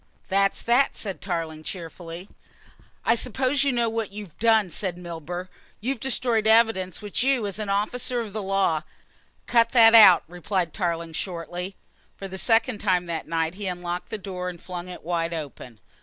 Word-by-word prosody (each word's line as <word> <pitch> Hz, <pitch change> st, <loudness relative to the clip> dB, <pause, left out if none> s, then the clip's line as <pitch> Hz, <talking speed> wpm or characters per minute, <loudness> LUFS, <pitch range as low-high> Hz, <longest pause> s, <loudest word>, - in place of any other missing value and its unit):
"That's 195 Hz, 0 st, +2 dB
that," 245 Hz, +4 st, +2 dB
said 195 Hz, -4 st, -4 dB
Tarling 165 Hz, -4 st, -3 dB
cheerfully. 170 Hz, +1 st, -8 dB, 0.8 s
"I 230 Hz, -, +5 dB
suppose 260 Hz, +3 st, +1 dB
you 280 Hz, -, +2 dB
know 240 Hz, -2 st, +1 dB
what 225 Hz, -2 st, -3 dB
you've 200 Hz, -5 st, -9 dB
done," 220 Hz, -5 st, +3 dB
said 180 Hz, +1 st, -1 dB
Milburgh. 175 Hz, +1 st, -6 dB, 0.3 s
"You've 250 Hz, +3 st, -2 dB
destroyed 235 Hz, -4 st, +1 dB
evidence 220 Hz, -5 st, +3 dB
which 205 Hz, +2 st, -2 dB
you, 260 Hz, -3 st, +2 dB
as 200 Hz, 0 st, -4 dB
an 210 Hz, -2 st, -3 dB
officer 240 Hz, +5 st, 0 dB
of 220 Hz, -4 st, -5 dB
the 215 Hz, -, -3 dB
law 195 Hz, -5 st, +1 dB, 0.3 s
" -, -, -37 dB
"Cut 230 Hz, -1 st, +3 dB
that 225 Hz, -2 st, +8 dB
out," 210 Hz, -6 st, +9 dB
replied 180 Hz, 0 st, -2 dB
Tarling 170 Hz, -4 st, -2 dB
shortly. 180 Hz, +2 st, -5 dB, 0.4 s
For 195 Hz, -, -6 dB
the 190 Hz, 0 st, -7 dB
second 225 Hz, 0 st, +2 dB
time 185 Hz, -4 st, +1 dB
that 165 Hz, -2 st, -4 dB
night 165 Hz, 0 st, -1 dB
he 200 Hz, +1 st, -5 dB
unlocked 175 Hz, 0 st, -4 dB
the 220 Hz, -, -3 dB
door 185 Hz, -2 st, -5 dB
and 175 Hz, -1 st, -9 dB
flung 180 Hz, 0 st, -7 dB
it 180 Hz, -, -9 dB
wide 170 Hz, 0 st, -1 dB
open. 135 Hz, -7 st, -8 dB
195 Hz, 175 wpm, -25 LUFS, 175-225 Hz, 0.8 s, out